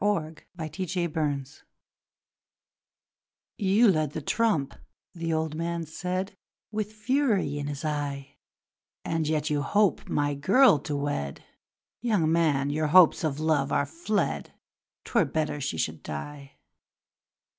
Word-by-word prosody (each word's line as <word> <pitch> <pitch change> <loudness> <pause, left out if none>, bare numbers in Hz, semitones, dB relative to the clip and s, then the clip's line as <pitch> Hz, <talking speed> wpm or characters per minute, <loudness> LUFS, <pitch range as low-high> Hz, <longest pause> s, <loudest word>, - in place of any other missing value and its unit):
The 165 -6 0 0.2
Last 160 +3 -4
Trump 155 -6 -1 2.1
'You 205 +3 +4
led 155 -4 0
the 155 - -4
trump,' 180 -9 +1 0.4
the 165 -1 -3
old 160 -1 -1
man 165 +1 -3
said 180 +4 -4 0.4
With 215 -1 -3
fury 215 - 0
in 145 - -3
his 145 +1 -5
eye, 145 -2 -3 0.7
'And 165 -2 -1
yet 155 -1 0
you 145 -1 +1
hope 205 +5 +1
my 145 0 +1
girl 185 - +5
to 145 +1 -4
wed! 140 - -3 0.6
Young 205 -10 +2
man! 145 -4 +2
your 155 +1 0
hopes 175 +2 +6
of 150 -2 -1
love 155 -3 +1
are 140 - +2
fled, 165 - -2 0.5
'Twere - - +2
better 155 -2 -2
she 85 - -2
should 80 0 -2
die! 140 - -7
155 Hz, 125 wpm, -27 LUFS, 145-185 Hz, 2.1 s, hopes